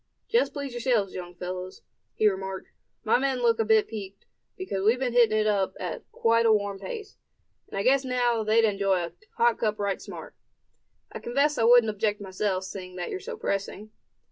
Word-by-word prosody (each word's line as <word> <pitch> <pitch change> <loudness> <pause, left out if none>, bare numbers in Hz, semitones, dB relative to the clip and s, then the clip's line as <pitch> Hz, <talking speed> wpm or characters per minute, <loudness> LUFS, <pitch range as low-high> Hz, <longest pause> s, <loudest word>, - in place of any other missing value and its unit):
"Just 475 +2 +2
please 280 -2 -5
yourselves, 235 -5 0
young 175 -1 -7
fellows," 180 +1 -6 0.3
he 215 - +3
remarked. 190 -1 -3 0.3
"My 225 +1 +3
men 270 -1 0
look 230 -1 +3
a - - +4
bit 220 -1 +3
peaked, 200 -3 -8 0.3
because 285 - -3
we've 220 +4 +4
been 250 -2 -2
hitting 230 -3 +4
it 215 - +2
up 195 -3 +1
at 180 - -6
quite 230 0 +2
a - - +5
warm 205 -2 0
pace; 410 - -7 0.5
and - - -7
I 195 - 0
guess 265 +3 +4
now, 245 -3 +1
they'd 220 +1 +4
enjoy 195 -3 +1
a 170 - -10 0.2
hot 235 -1 +3
cup 215 -2 0
right 200 -2 -2
smart. - - -9 0.8
I - - -6
confess 280 +5 +1
I 225 - +3
wouldn't 235 -2 +6
object 210 0 -1
myself, 190 -1 -2
seeing 185 -1 -8
that 180 -1 -4
you're 380 - -3
so 460 +4 -7
pressing." 200 - -3
215 Hz, 195 wpm, -27 LUFS, 195-240 Hz, 0.8 s, wouldn't